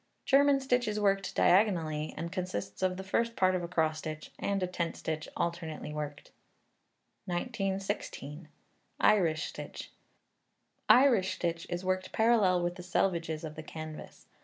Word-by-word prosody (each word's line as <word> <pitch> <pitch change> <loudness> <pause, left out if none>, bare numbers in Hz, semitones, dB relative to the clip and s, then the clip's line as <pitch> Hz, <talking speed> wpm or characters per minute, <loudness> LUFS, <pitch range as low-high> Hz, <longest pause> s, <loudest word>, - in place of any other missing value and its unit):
German 280 0 +5
stitch 250 -3 +1
is 210 0 -1
worked 195 -2 +1
diagonally, 165 -6 +3
and 170 0 -4
consists 180 - -4
of 185 -1 +1
the 190 - -5
first 230 +4 0
part 185 0 +3
of 185 - 0
a 170 - -4
cross 160 -3 0
stitch, 155 -1 -6
and 200 -1 0
a - - +3
tent 175 -2 -3
stitch 155 -1 -3
alternately 165 -3 -3
worked. 150 -1 -6 0.9
1916. 190 - -3 0.5
Irish 165 -7 +3
Stitch. - - -8 1.0
Irish 230 -8 +5
stitch 170 -1 -2
is 175 +1 -3
worked 185 0 -1
parallel 215 -6 +3
with 175 +1 -2
the - - -7
selvedges 170 -3 0
of 155 -1 -5
the 155 - -7
canvas. 155 0 -9
180 Hz, 145 wpm, -31 LUFS, 160-195 Hz, 1.0 s, German